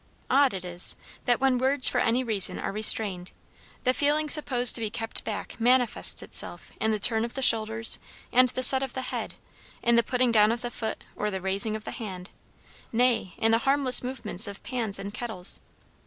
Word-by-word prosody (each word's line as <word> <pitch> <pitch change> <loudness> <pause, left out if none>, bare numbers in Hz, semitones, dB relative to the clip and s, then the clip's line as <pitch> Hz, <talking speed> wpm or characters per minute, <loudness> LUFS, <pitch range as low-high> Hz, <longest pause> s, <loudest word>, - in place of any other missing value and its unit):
Odd 270 -4 +3
it 185 -1 -6
is, 175 0 +1 0.3
that 245 -1 +1
when 265 -2 +1
words 260 0 +3
for - - 0
any 240 +3 0
reason 215 -6 +2
are - - -5
restrained, 200 -3 +3 0.5
the 255 - +1
feeling 300 +2 0
supposed 250 -6 +5
to 235 - 0
be 220 - -3
kept 225 0 -4
back 205 -2 -6
manifests 245 0 +2
itself - - -3
in 220 - 0
the 215 - -1
turn 220 +2 +2
of 235 - -7
the 270 - -3
shoulders 225 -1 +3 0.3
and 255 +1 +4
the 255 +1 -2
set 265 +1 +5
of 270 -2 -5
the 260 - -5
head, - - -5 0.5
in 235 0 +2
the - - +5
putting 250 +1 -1
down 215 -1 +4
of 235 +1 -4
the 240 - -5
foot 220 -2 -6
or 210 - -3
the 190 -2 -5
raising 195 +3 0
of 215 - -8
the - - -7
hand, 190 -6 -8 0.6
nay, 235 -5 0
in 225 0 0
the 225 - +3
harmless 270 0 +2
movements 245 -5 -2
of 200 -1 -10
pans 230 -6 -3
and 200 +1 -8
kettles. 215 -7 -5
230 Hz, 200 wpm, -25 LUFS, 210-255 Hz, 0.6 s, supposed